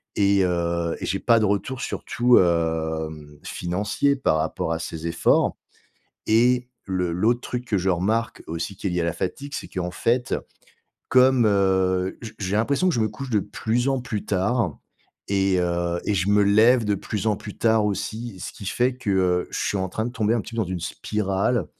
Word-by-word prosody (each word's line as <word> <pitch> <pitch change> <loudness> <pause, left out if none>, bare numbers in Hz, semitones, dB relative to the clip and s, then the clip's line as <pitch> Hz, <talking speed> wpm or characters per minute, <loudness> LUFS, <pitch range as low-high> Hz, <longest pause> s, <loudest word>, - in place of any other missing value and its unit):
et 100 -1 +3
heu, 85 -1 -1
et - - -4
j'ai 95 +2 -1
pas 115 -2 +4
de 110 - +2
retour 105 +6 -1
surtout, 125 0 +2
hem, 80 -3 -1
financier 100 +10 0
par 130 - +1
rapport 80 +1 -2
à 80 - -3
ces 80 0 -6
efforts, 85 - +2 0.7
et 125 +3 +3 0.2
le 90 -2 -1
l'autre 115 +7 +2
truc 125 0 -4
que 105 - 0
je 95 +1 +1
remarque 110 +6 -1
aussi, 85 +4 -4
qui 100 - -6
est - - +1
lié 90 - 0
à - - 0
la 85 - 0
fatigue 140 +10 -4
c'est - - -6
qu'en 90 -2 -3
fait 120 +6 0 0.8
comme, 130 -1 +5
heu, 95 -2 +2
j 110 - -7
j'ai 100 0 -1
l'impression 140 +11 +2
que 175 - +1
je 115 - 0
me 110 - +2
couche 135 -1 -7
de 105 - +3
plus 115 +5 -1
en 135 - 0
plus 120 -5 -4
tard 100 - 0 0.5
et 95 -2 +2
heu 85 0 -1
et 105 - +1
je 95 +1 0
me 105 0 +5
lève 110 +4 +5
de 105 - +2
plus 105 +3 -4
en 105 - +1
plus 105 - -9
tard 110 -2 +3
aussi 105 0 -4
ce - - -5
qui 100 - -11
fait 125 +4 +1
que, 110 -5 -3
heu, 90 -2 +1
je - - -4
suis 100 - -1
en 95 0 -1
train 110 +1 -2
de - - -3
tomber 110 -2 +1
un 115 - +1
petit 115 - -10
peu 110 - +2
dans - - -4
une 90 -2 -3
spirale, 100 +5 -1
100 Hz, 205 wpm, -24 LUFS, 90-115 Hz, 0.8 s, comme